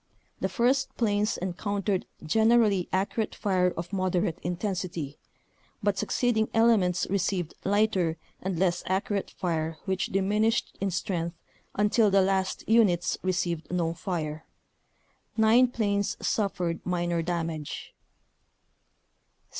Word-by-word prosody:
The - - -1
first 265 +2 +1
planes 210 -1 +1
en 185 -1 -2
countered 200 0 -1 0.2
generally 220 0 +3
accurate 200 +3 -1
fire 185 -3 +2
of 175 +3 -5
moderate 185 -3 0
intensity, 175 -5 -3 0.6
but 205 -1 +2
succeeding 220 +3 +1
elements 215 -6 +3
received 185 -3 0
lighter 195 -5 +2 0.2
and 185 -2 -2
less 180 -1 +1
accurate 195 +1 -1
fire 160 -2 -2
which 190 -1 0
diminished 210 +4 +1
in 200 - +1
strength 175 -2 -2 0.4
until 210 +1 +3
the 195 -1 +4
last 190 0 -1
units 210 -6 +3
received 175 -3 -1
no 170 -2 0
fire; 160 -3 -4 0.9
nine 225 +3 +6
planes 205 -4 -1
suffered 180 -5 -1
minor 175 -1 0
damage. 165 -3 -4
190 Hz, 110 wpm, -28 LUFS, 175-210 Hz, 0.9 s, nine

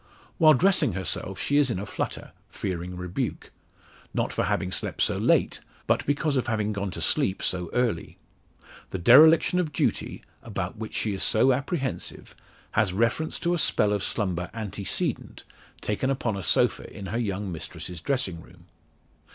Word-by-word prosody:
While 155 -3 +7
dressing 160 - +3
herself 95 +1 -3
she 145 - +1
is 145 -3 +4
in 105 - -1
a 100 - -4
flutter, - - -5 0.2
fearing 90 0 -5
rebuke. 90 0 -4 0.6
Not - - -1
for - - 0
having 90 - -1
slept - - 0
so - - 0
late, - - +2 0.3
but - - +1
because 145 0 +1
of 130 - -1
having 105 -2 0
gone 100 -1 -3
to - - -6
sleep 95 - +1
so 90 -2 -1
early. 120 -9 -1 0.7
The - - -4
dereliction 155 - +6
of 165 -4 -1
duty, - - -1 0.2
about 95 -4 -4
which 110 -1 -6
she 105 - -1
is 95 - -4
so 130 +4 +4
apprehensive, 140 0 -4 0.4
has 105 -4 +1
reference 115 +10 0
to 175 - +1
a 175 - 0
spell 105 -8 +2
of 100 - -1
slumber 90 -4 -1
antecedent 105 -3 -2 0.4
taken 105 +5 -1
upon 125 -6 -1
a 100 - -4
sofa 85 - +1
in 100 - -8
her 110 +4 -2
young 100 -3 -2
mistress's 85 0 -7
dressing 95 -11 -1
room. - - -18
105 Hz, 165 wpm, -26 LUFS, 95-135 Hz, 0.7 s, While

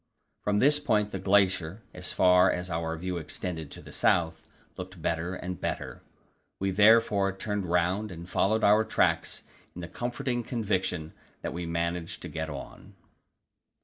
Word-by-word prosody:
From 105 0 +1
this 145 +6 +4
point 105 -7 +1
the 95 - -4
glacier, 95 0 +2
as 90 0 -4
far 90 0 +5
as 90 0 -4
our 80 0 -2
view 90 +2 -3
extended 80 -1 -5
to - - -11
the - - -12
south, 80 -1 +1 0.3
looked 90 -1 -8
better 85 +3 -1
and 90 -2 -6
better; - - -4 0.6
we 95 0 -1
therefore 105 -1 +5
turned 105 -2 -2
round 90 +5 +1
and 85 -1 -9
followed 110 +4 +1
our 105 +2 +6
tracks 110 - 0 0.3
in 90 - -6
the 85 - -5
comforting 120 +5 -2
conviction 95 -8 -2 0.3
that - - -3
we 85 0 -4
should - - -5
manage 85 0 -2
to - - -6
get 80 0 -4
on. 70 -2 -9
90 Hz, 160 wpm, -28 LUFS, 85-105 Hz, 0.6 s, our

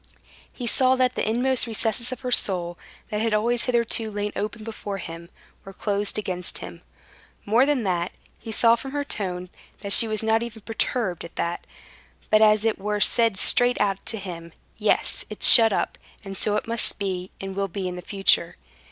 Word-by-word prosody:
He 245 - -7
saw 260 +2 +3
that 255 -1 +1
the - - -2
inmost 250 +2 +3
recesses 230 +2 -1
of 255 - -7
her 250 -1 -4
soul, 175 -6 +2 0.4
that 210 0 -2
had 225 -1 0
always 235 +3 0
hitherto 235 -2 +1
lain 205 0 -4
open 215 +2 -5
before 210 -2 -6
him, 170 -2 -9 0.3
were 195 - -11
closed 205 +1 +1
against 180 -4 -3
him. 85 - -10 0.6
More 235 +6 +3
than 285 -5 0
that, 180 -3 -2 0.3
he 225 - -8
saw 230 +1 +4
from 270 +3 -8
her 290 0 -2
tone 180 -8 -4 0.3
that 200 -1 -1
she 230 - +8
was 215 0 -2
not 220 0 +2
even 230 -2 -8
perturbed 220 - -2
at 170 - -11
that, 170 +1 -4 0.6
but 215 0 +5
as 215 0 +4
it 225 -2 0
were 210 +1 -2
said 230 -1 +3
straight 245 +5 +3
out 200 -2 -1
to 225 - 0
him: 170 -4 -8 0.2
"Yes, - - 0
it's - - +2
shut 225 -2 +8
up, - - -2 0.3
and 195 0 -7
so 210 +2 0
it 210 - -2
must 230 -1 0
be, 185 -2 -4
and 195 0 -7
will 200 0 -1
be 190 0 -5
in 180 0 -6
future." 195 -3 +1
210 Hz, 190 wpm, -23 LUFS, 195-230 Hz, 0.6 s, she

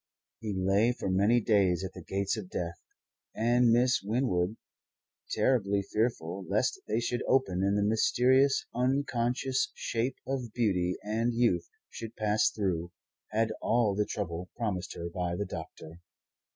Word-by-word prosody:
He 105 -3 -4
lay 100 +6 +3
for 95 - -3
many 100 +6 +4
days 100 -5 +2
at 95 - -5
the 90 - -9
gates 100 +4 -1
of 105 -5 -7
Death, 85 -2 -4 0.5
and 120 +1 +3
Miss 125 +2 +3
Winwood, 105 -3 0 0.7
terribly 100 -6 +2
fearful 100 -4 -1
lest - - +1
they 110 +2 +1
should 120 +1 -1
open 95 -9 +2
and 100 +1 +2
the 105 - +2
mysterious, 125 +5 +3
unconscious 130 0 0
shape 120 +3 -2
of 130 -4 -3
beauty 90 -6 +1
and 115 +3 0
youth 115 -8 +2 0.2
should 115 -1 -7
pass 105 0 +2
through, 90 -5 -2 0.4
had 110 +1 +1
all 115 -3 +2
the 105 +1 0
trouble 90 -3 -4
promised 100 -6 -3
her 85 - -4
by 85 0 -2
the 100 - -2
doctor. 85 -2 -9
105 Hz, 145 wpm, -30 LUFS, 95-120 Hz, 0.7 s, many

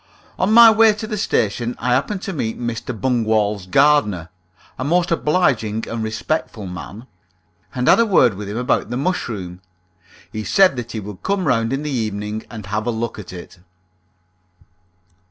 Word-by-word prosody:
On 190 - +2
my 230 0 +9
way 220 0 +5
to 215 +1 -6
the 215 0 -4
station 120 - -1
I 125 - -3
happened 185 +10 -1
to 195 - -4
meet 115 -8 -3
Mr. 120 0 -4
Bungwall's 110 -5 0
gardener 105 - +3 0.5
(a - - -2
most 175 +5 +1
obliging 130 - +1
and 115 -1 -4
respectful 110 0 -3
man), 95 +5 -8 0.7
and 125 0 -1
had - - +6
a 230 - +5
word 130 - +4
with 100 +1 -7
him 105 - -4
about 125 +1 0
the 120 - -3
mushroom. 105 - -3 0.7
He 110 - -5
said 190 - +4
that 120 -1 -5
he 110 - -3
would 105 -2 -9
come 195 -2 -1
round 115 -4 +1
in 135 +2 -2
the 150 - -3
evening 110 -3 -3
and 110 -4 -8
have 105 +2 -3
a - - +2
look 115 -1 -3
at 100 - -9
it. 90 0 -11
120 Hz, 175 wpm, -20 LUFS, 105-150 Hz, 0.7 s, my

